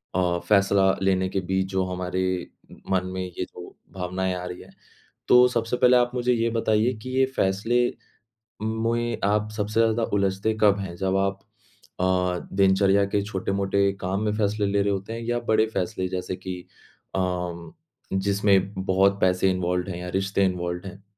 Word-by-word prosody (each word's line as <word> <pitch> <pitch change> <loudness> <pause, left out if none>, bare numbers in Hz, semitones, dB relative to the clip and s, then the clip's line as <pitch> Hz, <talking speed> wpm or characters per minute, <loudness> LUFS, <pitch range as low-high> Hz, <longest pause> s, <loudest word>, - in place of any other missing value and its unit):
अ, 90 -1 +1
फैसला 100 -1 +4
लेने 95 -1 +1
के 95 - -1
बीच 95 0 +1
जो 95 0 +1
हमारे 90 0 -2 0.7
मन 95 -1 +2
में 95 - -3
ये 90 0 -5
जो 90 - -12 0.2
भावनाएँ 95 0 -2
आ 90 0 -5
रही 90 0 -7
हैं। - - -15 0.6
तो 125 0 +7
सबसे 115 0 -1
पहले 125 0 +5
आप 120 0 +2
मुझे 125 0 +1
ये 115 0 +1
बताइए 115 +1 +1
कि 130 - -7
ये 130 - +5
फैसले 105 +6 +1 0.8
मुए 115 +2 -1
आप 105 +1 +1
सबसे 110 +1 -2
ज़्यादा 115 0 +2
उलझते 100 +2 +1
कब 100 -1 +5
हैं? 90 -3 -5
जब 95 +1 0
आप 95 0 0 0.6
अ, - - 0 0.5
दिनचर्या 100 +1 +4
के 100 +1 0
छोटे-मोटे 100 -1 0
काम 95 +2 -1
में 105 - +1
फैसले 105 0 0
ले 100 0 +1
रहे 100 0 +1
होते 100 +4 -4
हैं 115 - -5
या 120 0 0
बड़े 110 0 +4
फैसले 95 0 -1
जैसे 90 0 -3
कि 95 -1 -6 0.6
अ, - - +1 0.9
जिसमें 100 0 +2
बहुत 100 +1 +3
पैसे 95 +1 +3
इन्वॉल्वड 90 0 -1
हैं 85 - -4
या 90 0 -6
रिश्ते 95 0 +1
इन्वॉल्वड 90 0 -2
हैं? 95 +1 -10
100 Hz, 170 wpm, -25 LUFS, 95-110 Hz, 0.9 s, तो